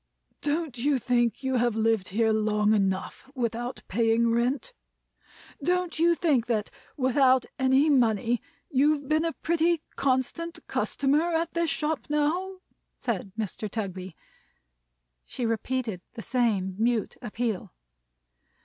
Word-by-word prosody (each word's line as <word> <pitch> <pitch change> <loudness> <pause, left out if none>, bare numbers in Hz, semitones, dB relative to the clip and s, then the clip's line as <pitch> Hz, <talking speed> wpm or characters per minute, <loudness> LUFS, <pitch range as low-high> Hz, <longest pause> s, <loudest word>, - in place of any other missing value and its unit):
"Don't 295 -4 -2
you 280 +3 +2
think 240 0 +1
you 265 -1 +1
have 240 -2 +1
lived 225 -3 +1
here 220 +3 +2
long 210 0 +2
enough 195 +5 -1
without 240 0 -3
paying 225 +2 +2
any 230 - +3
rent? 260 - 0 0.9
Don't 360 -2 0
you 340 +1 +4
think 280 -9 +1
that, 220 -4 -1 0.3
without 260 -1 +4
any 265 +3 +4
money, 235 -4 +2 0.3
you've 285 +1 +2
been 310 +2 +2
a 335 - 0
pretty 335 0 +1
constant 275 +6 0
customer 305 +5 +1
at 330 +1 -1
this 335 -1 +1
shop, 300 +1 -1
now?" 350 +6 0 0.4
said 200 -5 -3
Mr. 215 0 -3
Tugby. 190 -4 -5 1.1
She 245 - -4
repeated 230 -3 -2
the 225 - -7
same 210 -7 0
mute 230 -1 +1
appeal. 230 -3 -3
250 Hz, 125 wpm, -27 LUFS, 225-300 Hz, 1.1 s, you